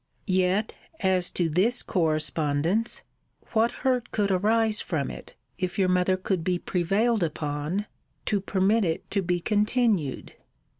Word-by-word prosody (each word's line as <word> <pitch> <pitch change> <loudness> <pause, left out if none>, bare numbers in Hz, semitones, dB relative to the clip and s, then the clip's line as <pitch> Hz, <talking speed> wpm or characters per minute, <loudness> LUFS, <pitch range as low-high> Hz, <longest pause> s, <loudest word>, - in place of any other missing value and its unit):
Yet, 185 +2 +1 0.3
as 185 -2 +2
to 175 - 0
this 195 +10 +2
correspondence, 160 +3 0 0.5
What 230 +1 +2
hurt 250 -2 +1
could 205 -2 0
arise 215 +3 +2
from 150 -6 -2
it, - - -11 0.2
if 185 0 -2
your 190 -2 +2
mother 180 +1 +2
could 185 -2 -2
be 180 +1 +1
prevailed 200 +7 +1
upon 155 +4 -2 0.4
to 205 -2 0
permit 200 +3 +2
it 165 -2 -3
to 200 - +1
be 180 -1 0
continued? 210 - 0
185 Hz, 135 wpm, -26 LUFS, 170-215 Hz, 0.5 s, as